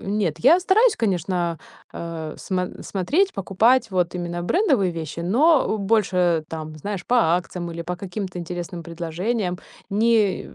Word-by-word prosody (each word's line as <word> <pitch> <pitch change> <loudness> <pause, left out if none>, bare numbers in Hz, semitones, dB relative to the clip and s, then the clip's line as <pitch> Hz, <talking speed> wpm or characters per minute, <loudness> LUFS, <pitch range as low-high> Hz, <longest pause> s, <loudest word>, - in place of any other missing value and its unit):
Нет, 195 -6 -1
я 325 +9 +6
стараюсь, 430 +6 +4
конечно, 175 -4 -1 0.3
э, 165 -2 -6
смо 180 -1 -2 0.2
смотреть, 295 - 0
покупать 220 +5 +2
вот 180 -2 0
именно 175 -1 -4
брендовые 255 - +2
вещи, 165 0 -5
но, 275 - +4
э, - - 0
больше, 180 -6 +1
там, 155 -1 -6
знаешь, 200 +3 -4
по 245 - 0
акциям 175 -2 0
или 170 0 -5
по 180 +1 -4
каким-то 185 -1 -5
интересным 175 0 -5
предложениям. 180 +4 -3 0.3
Не 215 -1 +2
180 Hz, 140 wpm, -23 LUFS, 170-220 Hz, 0.3 s, я